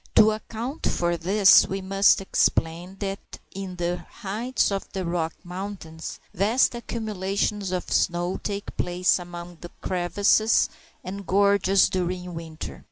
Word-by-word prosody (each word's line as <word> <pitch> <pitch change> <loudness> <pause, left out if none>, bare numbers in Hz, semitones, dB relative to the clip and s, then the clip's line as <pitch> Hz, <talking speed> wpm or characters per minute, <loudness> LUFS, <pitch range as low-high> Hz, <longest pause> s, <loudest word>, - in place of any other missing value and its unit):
To 220 0 +7
account 230 +6 -4
for 175 0 +1
this, 190 +4 +6
we 195 - -3
must 195 +1 +4
explain 175 -1 0
that 195 0 -2 0.3
in 190 -1 -6
the 175 0 -1
heights 215 +7 -2
of 195 0 -3
the 190 -1 -3
Rocky 170 -1 -1
Mountains 180 -3 -7
vast 215 +9 +3
accumulations 210 -4 -2
of 180 -1 -1
snow 175 +1 +1
take 200 -1 -5
place 180 +1 +2
among 175 0 -9
the 175 - -8
crevices 200 +4 +2 0.3
and 195 0 -7
gorges 200 0 +4
during 180 -1 -3
winter. 160 - -7
190 Hz, 130 wpm, -25 LUFS, 175-200 Hz, 0.3 s, To